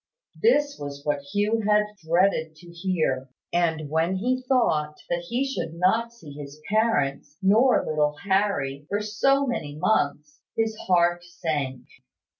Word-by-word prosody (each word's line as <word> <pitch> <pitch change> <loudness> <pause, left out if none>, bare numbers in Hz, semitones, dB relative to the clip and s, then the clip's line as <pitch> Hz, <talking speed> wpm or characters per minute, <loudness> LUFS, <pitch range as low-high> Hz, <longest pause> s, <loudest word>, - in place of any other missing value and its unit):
This 295 -10 +3
was 140 0 -7
what 145 -1 +1
Hugh 205 +8 0
had 210 0 +4 0.2
dreaded 160 -1 +2
to 170 +2 -14
hear; 165 -7 -1 0.2
and 160 -3 +1
when 160 +5 +1
he 250 +6 0
thought 150 - +2
that 175 0 -1
he 250 +3 0
should 165 -12 -4
not 220 +7 +2
see 165 -11 -13
his 145 +1 -9
parents, 155 -10 0
nor 215 +7 +4
little 150 -1 +1
Harry, 190 -8 0
for 205 - 0
so 270 +7 +2
many 155 - -3
months, 150 -4 0 0.2
his 225 -1 +1
heart 175 -1 +3
sank. 145 -7 -3
175 Hz, 140 wpm, -25 LUFS, 150-215 Hz, 0.2 s, had